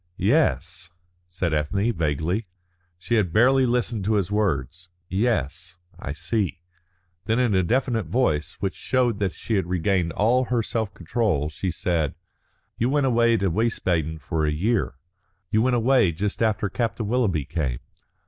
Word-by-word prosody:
"Yes," 90 +8 +1 0.4
said 90 -1 -2
Ethne, 100 +10 0
vaguely. 80 +5 -1 0.5
She 115 +7 0
had 95 -6 +1
barely 130 +6 +4
listened 120 -3 0
to 110 +1 +2
his 100 -2 0
words. 85 - -1 0.2
"Yes, 90 - -1 0.2
I 70 - -5
see." 90 +5 -2 0.7
Then 110 0 +1
in 125 -4 +2
a 95 - +4
definite 115 - 0
voice, 80 - 0
which 95 -2 -1
showed 125 -5 0
that 100 -3 -1
she 110 - -1
had 95 - -1
regained 90 -1 0
all 125 +7 +2
her 120 -2 0
self 110 -3 -2
control, 85 - 0
she 85 +5 -3
said: 80 -4 -1 0.6
"You 120 - +2
went 145 0 +2
away 115 -2 +3
to 95 -4 0
Wiesbaden 85 -7 0
for 80 0 -2
a 75 - +2
year. 95 - 0 0.6
You 110 - +3
went 125 +1 +2
away 120 -6 +3
just 100 +7 -3
after 110 -2 +1
Captain 115 0 -2
Willoughby 105 - +1
came. 70 -7 -2
100 Hz, 155 wpm, -24 LUFS, 85-115 Hz, 0.7 s, barely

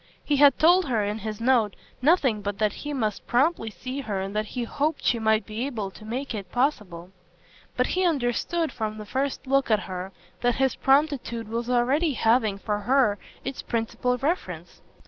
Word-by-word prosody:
He 290 - +1
had 280 -1 +6
told 350 +3 +5
her 230 -5 +1
in 210 +2 -2
his 215 0 -5
note 230 -4 +2 0.3
nothing 265 - +3
but 200 0 -3
that 210 -1 +1
he 295 - -6
must 220 -7 -2
promptly 250 -2 +2
see 255 +5 -6
her 205 -7 -3
and 195 +2 -4
that 215 0 -1
he 245 +3 -4
hoped 290 +6 -1
she 235 - +2
might 220 -1 +2
be 220 +3 -4
able 215 -8 -4
to 215 - -14
make 250 +5 -4
it 195 -4 -6
possible; 200 - -1 0.7
but 250 - +3
he 370 +6 0
understood 320 +2 0
from 215 -1 -4
the 215 - -7
first 270 +6 -2
look 275 0 +2
at 215 -2 +3
her 185 0 -6 0.3
that 245 -1 +2
his 265 -2 +2
promptitude 270 -5 +1
was 230 +2 -3
already 265 +6 +2
having 225 -3 +2
for 205 +1 -2
her 240 -3 +2 0.3
its 270 0 -4
principal 240 +2 -1
reference. 185 - -3
240 Hz, 185 wpm, -25 LUFS, 215-275 Hz, 0.7 s, had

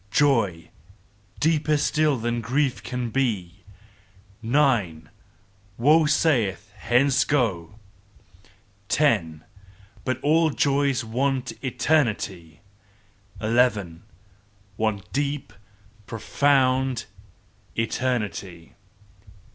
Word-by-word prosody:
_ - - -32
"Joy 110 - +1 0.7
deeper 155 -1 +2
still 150 -1 +1
than 120 +1 -2
grief 130 +4 0
can 125 -2 -4
be: 100 -8 -2 0.8
Nine! 115 - +1 0.7
"Woe 150 +6 +4
saith: 105 - +1
Hence! 125 +6 +2
Go! 110 - -1 1.1
Ten! 90 - +1 0.6
"But 130 -1 -3 0.3
joys 140 -2 +1
all 110 - -11
want 130 +1 -1
eternity 110 - -1 0.8
Eleven! 105 -6 +1 0.7
"Want 110 -2 -3
deep 145 0 -2 0.5
profound 130 +1 +1 0.7
eternity!" 105 -8 -3
120 Hz, 75 wpm, -24 LUFS, 100-140 Hz, 1.1 s, Woe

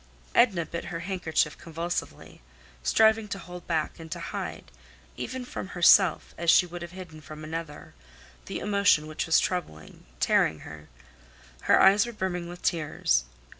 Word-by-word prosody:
Edna 190 -9 +3
bit 170 - -6
her 165 -1 -5
handkerchief 170 -5 -1
convulsively, 165 - -5 0.4
striving 220 - +3
to 200 - -4
hold 180 0 -10
back 160 0 -1
and 160 -1 -10
to - - -4
hide, - - -6 0.4
even 255 -1 -5
from 215 - -6
herself 180 -1 +4
as 170 0 0
she 180 - +6
would 175 0 -8
have 170 - -6
hidden 175 -4 -10
from 155 +1 -10
another, 160 -1 -7 0.5
the - - -4
emotion 200 -7 +2
which 155 +2 -4
was 160 - +5
troubling—tearing—her. 75 - -2 0.7
Her - - +4
eyes 200 +3 +6
were 240 - -6
brimming 180 -4 -3
with 175 0 -10
tears. 150 - +1
170 Hz, 145 wpm, -27 LUFS, 155-190 Hz, 0.7 s, she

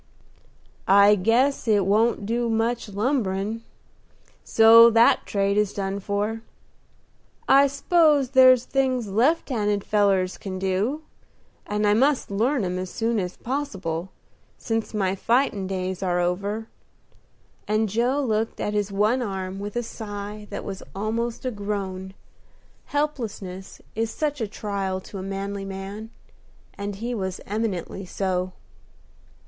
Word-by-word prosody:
"I 200 +1 +7
guess 230 +8 +2
it 205 -3 +3
won't 215 +1 +2
do 235 +2 -1
much 225 0 -1
lumberin', 210 -1 -1 0.8
so 230 +1 +8
that 230 +1 +4
trade 200 0 0
is 210 -1 +1
done 195 0 -2
for. 205 +3 -2 1.1
I 275 +1 +6
s'pose 285 -1 +3
there's 255 -2 +6
things 255 -5 0
left 255 +14 +2
handed 210 -5 0
fellers 195 -3 +1
can 190 -2 -5
do, 195 +11 -1 0.6
and 210 0 0
I 205 - +4
must 270 +1 +2
learn 230 +3 +1
'em 180 0 -2
as 185 0 -4
soon 225 +2 -1
as 180 -2 -4
possible, 195 - -3 0.5
since 225 -1 -3
my 190 -3 +1
fightin' 225 -1 +1
days 185 -1 -3
are 180 -2 0
over," 200 +5 -2 1.0
and 215 +1 +1
Joe 245 +7 0
looked 220 -2 -1
at 210 - -2
his 205 -1 -1
one 210 +6 +2
arm 190 -3 -4
with 205 +2 -6
a 240 - -1
sigh 210 -2 -7
that - - -6
was 195 -1 -6
almost 225 +4 -3
a 255 - 0
groan, 195 -3 -4 0.7
helplessness 220 -11 -4
is 225 +1 -1
such 290 +2 -2
a 220 - -1
trial 200 -2 -3
to 195 - -9
a - - -5
manly 195 +1 -4
man, 195 +3 -7 0.6
and 200 0 -5
he 235 +5 -4
was 190 -4 -3
eminently 200 -3 -3
so. 185 -1 -2
210 Hz, 135 wpm, -24 LUFS, 195-235 Hz, 1.1 s, so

